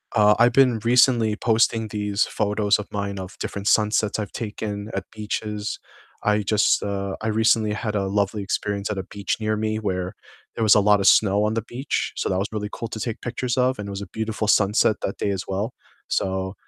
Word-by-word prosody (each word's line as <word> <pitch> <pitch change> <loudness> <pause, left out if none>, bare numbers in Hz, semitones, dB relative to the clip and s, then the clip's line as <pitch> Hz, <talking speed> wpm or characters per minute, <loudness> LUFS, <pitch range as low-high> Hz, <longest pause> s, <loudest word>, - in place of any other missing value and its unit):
uh, 105 -1 +5
I've 120 0 +5
been 125 -4 +4
recently 120 -2 +4
posting 115 0 +2
these 105 0 0
photos 105 -1 +1
of 105 - -6
mine 100 -1 -3
of 95 +1 -8
different 100 0 -4
sunsets 105 0 +2
I've 105 -3 -4
taken 105 -1 -5
at 100 - -2
beaches. 105 0 -4 0.4
I 105 0 +2
just, 105 +1 +2
uh, 100 -1 -3
I 110 - -2
recently 110 0 +2
had 105 0 -3
a 100 -1 0
lovely 100 +1 0
experience 100 +1 -2
at 105 - -3
a - - -3
beach 100 -1 -2
near 110 0 0
me 110 0 -1
where 95 -4 -2 0.4
there 115 - -1
was 110 - +6
a - - +6
lot 105 0 +4
of 95 - +2
snow 100 -1 +5
on 105 +1 +1
the 115 - 0
beach, 125 +5 -3
so - - -2
that 95 - 0
was 100 - -1
really 105 -1 -3
cool 115 - -5
to 110 - -6
take 115 0 -4
pictures 120 +1 -3
of, 130 +1 +2
and 105 - -5
it - - -5
was 100 - -5
a 100 - -6
beautiful 110 -1 -2
sunset 105 +1 +3
that 95 - -3
day - - -1
as 95 -2 -3
well. 100 +5 -2 0.3
So, 95 0 -1
105 Hz, 215 wpm, -23 LUFS, 100-110 Hz, 0.4 s, was